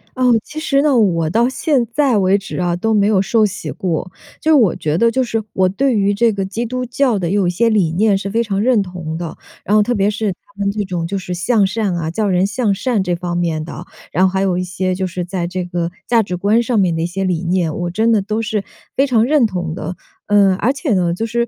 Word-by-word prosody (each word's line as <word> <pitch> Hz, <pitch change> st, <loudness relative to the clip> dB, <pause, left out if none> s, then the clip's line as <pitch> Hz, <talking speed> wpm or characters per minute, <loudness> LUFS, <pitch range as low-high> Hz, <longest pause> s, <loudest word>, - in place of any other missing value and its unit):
哦， 255 Hz, -1 st, +1 dB, 0.2 s
其 310 Hz, -, -7 dB
实 275 Hz, -3 st, +1 dB
呢， 290 Hz, -4 st, +3 dB
我 170 Hz, -8 st, +2 dB
到 235 Hz, +8 st, +2 dB
现 265 Hz, -2 st, +1 dB
在 270 Hz, -2 st, +2 dB
为 190 Hz, +1 st, +3 dB
止 200 Hz, +3 st, -7 dB
啊， 175 Hz, -1 st, 0 dB
都 220 Hz, +5 st, 0 dB
没 205 Hz, -1 st, +3 dB
有 205 Hz, -3 st, +3 dB
受 220 Hz, +2 st, +2 dB
洗 200 Hz, +1 st, -4 dB
过。 180 Hz, 0 st, -3 dB, 0.3 s
就 315 Hz, 0 st, +3 dB
我 225 Hz, -, +4 dB
觉 155 Hz, 0 st, -2 dB
得 230 Hz, +3 st, +4 dB
就 260 Hz, +3 st, +1 dB
是 225 Hz, -2 st, -2 dB
我 190 Hz, -1 st, +2 dB
对 225 Hz, +5 st, +1 dB
于 200 Hz, 0 st, +2 dB
这 225 Hz, +3 st, +3 dB
个 195 Hz, -2 st, -2 dB
基 225 Hz, +5 st, -3 dB
督 255 Hz, +2 st, -3 dB
教 250 Hz, -2 st, +1 dB
的 175 Hz, -3 st, -2 dB
有 200 Hz, -3 st, +2 dB
一 -, -, +2 dB
些 230 Hz, +7 st, +1 dB
理 195 Hz, -7 st, +2 dB
念 205 Hz, +3 st, +3 dB
是 195 Hz, 0 st, -3 dB
非 230 Hz, +3 st, +1 dB
常 200 Hz, -3 st, -1 dB
认 240 Hz, -3 st, +3 dB
同 175 Hz, -3 st, -6 dB
的， 170 Hz, -2 st, -5 dB, 0.3 s
然 205 Hz, -, +1 dB
后 215 Hz, -, +6 dB
特 245 Hz, +3 st, 0 dB
别 200 Hz, +1 st, +2 dB
是 210 Hz, -1 st, -1 dB
他 -, -, -15 dB
们 200 Hz, 0 st, +1 dB
这 210 Hz, 0 st, -2 dB
种 175 Hz, -3 st, -3 dB
就 200 Hz, -, -3 dB
是 180 Hz, -1 st, -5 dB
向 205 Hz, +4 st, +2 dB
善 200 Hz, -2 st, -1 dB
啊 165 Hz, -1 st, -3 dB
教 210 Hz, +4 st, -1 dB
人 185 Hz, 0 st, +2 dB
向 210 Hz, -1 st, 0 dB
善 235 Hz, 0 st, 0 dB
这 180 Hz, -1 st, -1 dB
方 175 Hz, 0 st, -4 dB
面 165 Hz, -3 st, -1 dB
的， 165 Hz, -, -8 dB, 0.3 s
然 185 Hz, -, +2 dB
后 185 Hz, -, -2 dB
还 190 Hz, -, 0 dB
有 190 Hz, -2 st, +1 dB
一 180 Hz, -, -1 dB
些 185 Hz, +1 st, -2 dB
就 185 Hz, 0 st, -2 dB
是 180 Hz, 0 st, -4 dB
在 175 Hz, -1 st, -3 dB
这 180 Hz, 0 st, -4 dB
个 175 Hz, -1 st, -3 dB, 0.2 s
价 230 Hz, -2 st, +4 dB
值 180 Hz, -3 st, -4 dB
观 210 Hz, +5 st, +2 dB
上 235 Hz, -2 st, 0 dB
面 180 Hz, -4 st, +2 dB
的 160 Hz, -, -2 dB
一 170 Hz, -, 0 dB
些 190 Hz, +2 st, -3 dB
理 180 Hz, -2 st, -1 dB
念， 170 Hz, -3 st, 0 dB
我 175 Hz, 0 st, -2 dB
真 220 Hz, +6 st, +1 dB
的 215 Hz, -3 st, +3 dB
都 215 Hz, +3 st, -2 dB
是 215 Hz, -2 st, -2 dB, 0.3 s
非 275 Hz, +1 st, +3 dB
常 230 Hz, -3 st, +3 dB
认 270 Hz, -3 st, +3 dB
同 175 Hz, -4 st, -4 dB
的。 180 Hz, +1 st, -5 dB, 0.3 s
呃， 200 Hz, -2 st, +4 dB
而 245 Hz, +6 st, +1 dB
且 280 Hz, -3 st, -1 dB
呢， 180 Hz, -3 st, +1 dB
就 225 Hz, -, -2 dB
是， 235 Hz, +1 st, -1 dB
200 Hz, 285 characters per minute, -18 LUFS, 180-230 Hz, 0.3 s, 后